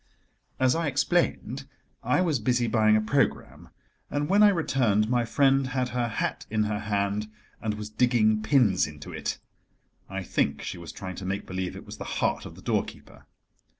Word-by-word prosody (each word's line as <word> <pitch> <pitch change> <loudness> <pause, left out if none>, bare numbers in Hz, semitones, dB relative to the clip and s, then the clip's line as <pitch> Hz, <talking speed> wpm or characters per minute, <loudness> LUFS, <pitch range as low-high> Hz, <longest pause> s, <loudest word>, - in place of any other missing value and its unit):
As 130 -1 +4
I 165 -1 0
explained, 140 -2 0 0.3
I 125 +9 +2
was 160 -8 +1
busy 120 +2 +1
buying 110 -1 +4
a 110 - +3
programme, 125 +3 -1 0.4
and 145 0 -1
when 200 +2 +5
I 210 - +8
returned 120 - +1
my 120 -1 +2
friend 135 +1 +3
had 130 -1 -1
her 120 -1 -1
hat 110 - -3
in 110 0 +1
her 105 -1 -1
hand, 105 0 -1 0.3
and 110 -1 -1
was 105 0 -7
digging 110 -2 +3
pins 110 - +3
into 75 -1 -10
it: - - -3 0.7
I 95 0 -4
think 70 -4 -1
she 90 - -5
was 85 -1 -8
trying 95 -3 -7
to 95 - -6
make 100 +1 -2
believe 95 -1 -4
it - - -9
was - - -9
the - - -7
heart - - 0
of - - -12
the - - -14
doorkeeper. - - -3
110 Hz, 185 wpm, -27 LUFS, 105-130 Hz, 0.7 s, I